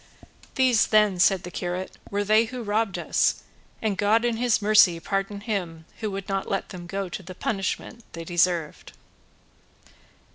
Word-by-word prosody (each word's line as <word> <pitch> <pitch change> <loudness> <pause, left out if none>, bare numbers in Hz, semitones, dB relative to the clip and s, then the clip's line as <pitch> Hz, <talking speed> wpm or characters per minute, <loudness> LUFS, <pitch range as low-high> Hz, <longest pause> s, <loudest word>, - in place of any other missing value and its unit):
"These, 255 -5 +4
then," 210 -4 +3
said 185 0 +4
the 180 - -7
curate, 180 +1 -4
"were 205 0 -1
they 215 +2 +4
who 250 +1 -6
robbed 210 -1 0
us; - - +1 0.4
and 205 -3 -1
God 220 +3 +3
in 235 -2 0
his 245 -1 +2
mercy 205 -5 +5
pardon 195 +3 -3
him 180 -7 -4
who 215 - -2
would 195 -1 -6
not 195 -1 -2
let 195 - -2
them 175 -2 -9
go 195 +2 -3
to 180 - -6
the 185 0 -10
punishment 220 +4 -3
they 165 - -6
deserved." 170 -2 0
195 Hz, 160 wpm, -25 LUFS, 180-215 Hz, 0.4 s, mercy